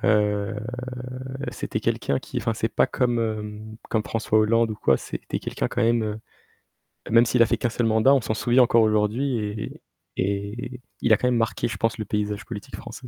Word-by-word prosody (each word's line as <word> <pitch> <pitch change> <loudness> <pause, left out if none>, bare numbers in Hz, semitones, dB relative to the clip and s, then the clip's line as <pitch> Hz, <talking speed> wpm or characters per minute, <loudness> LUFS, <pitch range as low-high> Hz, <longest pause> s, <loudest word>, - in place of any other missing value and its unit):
Heu, 105 0 +2 0.9
c'était - - -4
quelqu'un 70 - 0
qui, - - -5
enfin - - -1
c'est - - -1
pas - - +2
comme 120 -1 0
hem, 110 -1 -4
comme 110 - +1
François 110 -1 +1
Hollande 115 +1 +3
ou - - -3
quoi, 70 -10 +3
c'était - - -5
quelqu'un - - -3
quand 120 - -1
même, 115 0 +3
heu, 110 0 -3 0.9
même 115 +1 +6
s'il 120 +1 +2
a - - +3
fait - - 0
qu'un 120 - 0
seul 120 +1 -1
mandat, 110 +4 +5
on 135 - +4
s'en 110 - -1
souvient 120 +3 +4
encore 115 -1 +4
aujourd'hui 110 +5 +1
et 105 -1 -5 0.4
et 105 +6 -3 0.2
il 115 - +4
a - - +6
quand 125 - 0
même 125 -1 +2
marqué, 115 -1 0
je 105 - -5
pense, 115 +3 0
le 110 - -3
paysage 105 0 -2
politique 115 +3 -7
français. 125 - -9
110 Hz, 200 wpm, -24 LUFS, 105-120 Hz, 0.9 s, même